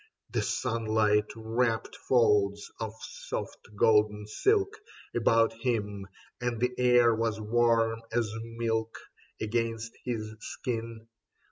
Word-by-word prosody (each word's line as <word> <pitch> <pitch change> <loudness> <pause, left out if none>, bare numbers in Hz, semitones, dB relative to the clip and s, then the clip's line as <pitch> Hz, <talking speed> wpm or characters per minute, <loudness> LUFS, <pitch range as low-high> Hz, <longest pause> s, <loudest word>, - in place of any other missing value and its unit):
The - - 0
sunlight 110 -2 +1
wrapped 115 +1 -1
folds 105 -5 +2
of 110 -1 -4
soft - - -6 0.2
golden 105 0 +3
silk 400 - +1 0.4
About 115 -1 +3
him, 105 -5 -1 0.3
and 120 -2 -1
the 125 +1 +1
air 120 -2 +5
was 110 -1 -1
warm 115 0 +2
as 115 -2 0
milk 115 -1 -2 0.4
Against 115 0 -2
his 110 -3 -3
skin. 115 -1 -5
115 Hz, 105 wpm, -29 LUFS, 110-120 Hz, 0.4 s, air